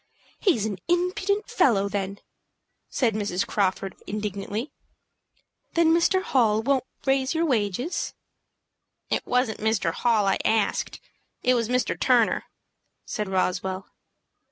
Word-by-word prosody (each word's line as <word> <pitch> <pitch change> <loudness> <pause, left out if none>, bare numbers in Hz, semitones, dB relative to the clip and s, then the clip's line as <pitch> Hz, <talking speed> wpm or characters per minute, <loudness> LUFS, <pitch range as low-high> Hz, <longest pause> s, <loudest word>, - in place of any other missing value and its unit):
"He's 300 - +2
an 205 -3 -3
impudent 380 +4 0
fellow, 215 - +3
then!" 200 -1 -3 0.7
said 235 -4 +1
Mrs. 200 -3 -1
Crawford, 195 -1 -1
indignantly. 210 +4 -4 1.0
"Then 330 -1 +4
Mr. 370 +3 +3
Hall 225 - +2
won't 265 0 +1 0.2
raise 270 +2 +1
your 330 +1 +2
wages?" 245 - -1 1.0
"It - - +1
wasn't 250 -3 +1
Mr. 215 -6 +1
Hall 225 -2 +2
I 195 - +2
asked. 220 -2 0 0.4
It 255 - +4
was 235 -2 0
Mr. 250 0 0
Turner," - - +3 0.6
said 210 -3 -3
Roswell. 190 0 -1
220 Hz, 115 wpm, -25 LUFS, 200-275 Hz, 1.0 s, Then